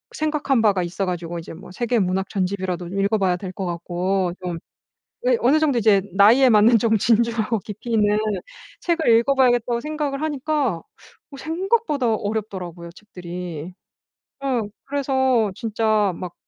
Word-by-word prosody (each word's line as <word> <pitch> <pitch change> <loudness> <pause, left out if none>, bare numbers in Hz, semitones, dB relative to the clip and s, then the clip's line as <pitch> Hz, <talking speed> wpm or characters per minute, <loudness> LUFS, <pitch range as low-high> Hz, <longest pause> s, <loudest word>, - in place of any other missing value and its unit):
생각한 300 -5 0
바가 200 -4 +3
있어 175 +3 -3
가지고 175 -2 -4
이제 165 - -9
뭐 180 +4 -12
세계 240 +4 0
문학 190 0 0
전집이라도 185 -2 -2
읽어 195 +4 0
봐야 185 -2 +2
될 185 0 -6
것 195 0 -5
같고. 180 +2 -1
좀 175 -2 -3 0.7
예 - - +4
어느 280 +5 +4
정도 295 -5 +2
이제 205 -3 +4
나이에 230 +7 +6
맞는 220 +2 +6
좀 220 0 +2
진중하고 230 0 +1
깊이 210 +4 -8
있는 210 -1 +3 0.6
책을 335 -4 0
읽어 275 +4 +1
봐야겠다고 245 -2 +2
생각을 295 -1 -3
하니까 295 - -1
어 440 - -19
생각보다 320 - 0
어렵더라고요 190 -6 -5
책들이. 180 -4 -8 0.7
어 260 -4 0 0.2
그래서 265 -6 +1
진짜 215 -3 +1
막 180 -2 -7
215 Hz, 320 characters per minute, -22 LUFS, 185-265 Hz, 0.7 s, 나이에